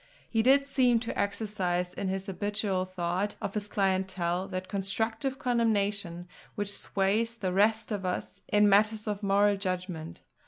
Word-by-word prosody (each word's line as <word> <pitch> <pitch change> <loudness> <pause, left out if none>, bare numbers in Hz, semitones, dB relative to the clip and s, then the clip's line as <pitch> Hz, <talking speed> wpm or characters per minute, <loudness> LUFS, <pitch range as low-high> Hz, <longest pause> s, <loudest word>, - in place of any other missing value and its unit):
He 225 - +1
did 275 +4 +5
seem 255 -4 +3
to 235 - -4
exercise 190 -4 -1
in 190 - -3
his 190 0 -2
habitual 205 -1 -1
thought 185 +2 -2
of 195 - -4
his 210 -1 -3
clientele 190 -2 0
that 185 -1 -5
constructive 220 +6 -2
condemnation 205 -8 0 0.3
which 205 -1 -1
sways 210 +4 0
the 190 -6 -2
rest 215 +4 +2
of 205 -2 -2
us 180 -1 -3
in 210 0 +4
matters 210 +2 +3
of 210 -2 -3
moral 200 0 +3
judgment. 180 -4 -4
200 Hz, 150 wpm, -29 LUFS, 185-220 Hz, 0.3 s, did